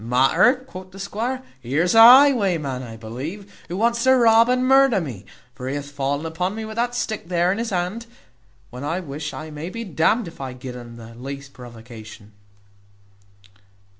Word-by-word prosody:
"Matter!" 135 - +3
quoth 185 -6 -10
the 190 - -14
squire, 235 +6 -4 0.2
"here's 145 +9 0
a 225 - +6
highwayman, 205 - +6
I 115 -3 -9
believe, 140 - -8
who 175 - -5
wants 235 +2 +1
to 260 0 +6
rob 230 -1 +5
and 255 0 +1
murder 270 -5 +5
me 120 - -7 0.3
for 130 0 -6
he 140 - -3
hath 145 0 -6
fallen 145 +2 -2
upon 180 +5 -3
me 220 0 -5
with 220 +1 -8
that 240 +1 -1
stick 220 -6 -3
there 175 0 +1
in 200 - -2
his 230 0 -2
hand, 190 +5 -3 0.6
when 125 +2 -8
I 165 +5 -2
wish 150 -2 -6
I 155 0 -8
may 150 +3 -6
be 230 +4 -6
d 160 -6 -4
n'd 220 +3 +2
if 165 - -11
I 130 -2 -5
gid 125 0 -9
un 120 -1 -10
the 115 0 -12
least 135 +3 -9
provocation." 115 -3 -12
170 Hz, 190 wpm, -22 LUFS, -, 0.6 s, a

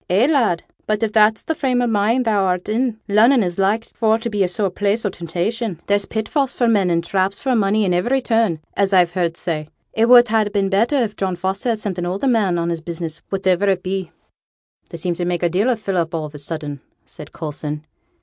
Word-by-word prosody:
Eh, 195 +7 +4
lad? 245 - +2 0.2
but 215 0 0
if 220 - 0
that's 215 0 +4
the 320 - -1
frame 260 -5 0
o' 245 - +2
mind 225 +3 +1
thou'rt 190 -5 +1
in, 225 +1 -1
Lunnon 225 +4 +5
is 175 0 -3
like 210 +4 +1
for 220 -1 +1
to 230 0 -5
be 205 -2 +1
a - - +1
sore 190 +2 -1
place 205 +4 -1
o' 205 - 0
temptation. 180 +4 -3
There's 205 -1 +1
pitfalls 250 +5 -1
for 240 - +1
men, 205 -5 +3
and 170 -1 +1
traps 190 +2 0
for 260 -2 0
money 210 0 +2
at 180 - +1
ivery 240 +10 +1
turn, 225 -10 +1
as 200 0 +1
I've 180 -2 +4
heerd 170 -2 -1
say. 155 -3 -3 0.3
It 225 +2 +2
would 245 -1 +8
ha' 215 -2 +1
been 200 -1 0
better 220 +8 +2
if 230 -6 0
John 190 -2 -2
Foster 190 +6 -2
had 230 - +1
sent 195 -4 -4
an 175 - -2
older 195 +9 -1
man 210 -8 +2
on 170 0 -1
his 165 -1 -3
business, 165 -1 -6
whativer 190 0 +1
it 185 -2 0
be.' 190 -1 -3 0.8
'They - - -7
seem 175 +2 -2
to 175 - -4
make 175 0 -2
a 175 - +3
deal 195 +8 +1
o' 250 - +2
Philip 185 -6 -2
all 160 - -2
on 150 - -7
a 150 - -8
sudden,' 145 -2 -4 0.2
said 150 - -12
Coulson. 150 -1 -6
195 Hz, 230 wpm, -20 LUFS, 175-225 Hz, 0.8 s, would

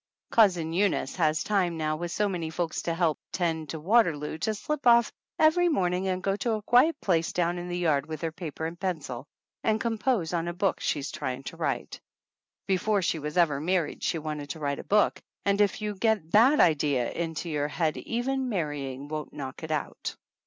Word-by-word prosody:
Cousin 180 -7 +4
Eunice 190 -6 0
has 155 -2 +2
time 185 -5 +1
now 155 -1 0
with 170 +2 -4
so 210 +3 +1
many 175 -5 -3
folks 165 0 -2
to 170 - -1
help 165 -3 +1
tend 160 -4 -1
to 160 - -4
Waterloo 160 -5 +2
to 215 +5 0
slip 285 +5 -2
off 235 -1 +6 0.3
every 345 +3 +4
morning 185 - +1
and 185 -1 -1
go 195 0 +1
to 230 +1 0
a 215 - -2
quiet 280 +8 +4
place 165 -4 +1
down 175 0 0
in 175 - -6
the 175 0 -3
yard 155 -5 +1
with 155 -1 -6
her 165 -1 -2
paper 160 -2 -6
and 165 +1 -5
pencil 145 -9 -4 0.4
and 220 0 +2
compose 225 -6 0
on 170 -1 0
a 175 - -2
book 190 +1 0
she's 145 -1 -2
trying 130 +1 -4
to - - -7
write. - - -3 0.6
Before 195 +1 +1
she 165 - 0
was 150 +3 -5
ever 150 -5 +3
married 175 -1 0
she 170 - 0
wanted 150 -2 -5
to 160 - -5
write 140 -2 -2
a - - -6
book, 210 +1 +2 0.2
and 200 +1 +3
if 205 +1 +1
you 210 - -1
once 200 - -10
get 215 -8 +1
that 250 +8 +6
idea 145 -7 +3
into 165 0 -3
your 145 -2 0
head 155 +1 0
even 260 +2 -2
marrying 145 - -3
won't 155 0 -5
knock 135 -3 -7
it 160 - -6
out. 155 -2 -3
170 Hz, 205 wpm, -28 LUFS, 155-205 Hz, 0.6 s, off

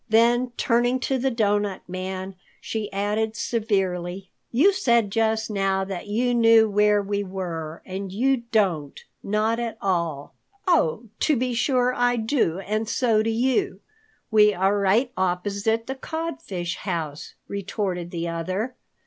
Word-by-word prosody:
Then 240 +3 +4
turning 245 +2 +2
to 265 -1 0
the 265 +2 +1
Doughnut 205 -4 0
Man, 185 +1 -5 0.3
she 220 -2 -4
added 210 +3 -1
severely, 195 -5 -1 0.2
"You 320 +12 +5
said 235 - +2
just 220 0 +1
now 195 -1 +1
that 190 0 -6
you 240 +4 +1
knew 225 -1 +6
where 210 0 +3
we 200 0 -1
were, 170 -5 -5
and 190 0 -5
you 260 +7 +2
don't 175 -10 +1 0.3
at 225 +2 0
all." 170 -7 -1 0.3
"Oh, 245 - +2 0.2
to 305 - +3
be 250 0 -1
sure 250 +1 +2
I 245 0 +2
do, 225 - +1
and 215 +3 -2
so 225 -4 +2
do 225 - 0
you. 260 - +1 0.5
We 210 -1 +5
are 195 +3 +2
right 215 +6 +2
opposite 200 +5 0
the 265 - -3
Codfish's 265 - -4
house," 160 -6 -4
retorted 195 -3 -3
the 170 -1 -3
other. 185 +9 -3
210 Hz, 140 wpm, -24 LUFS, 190-235 Hz, 0.5 s, knew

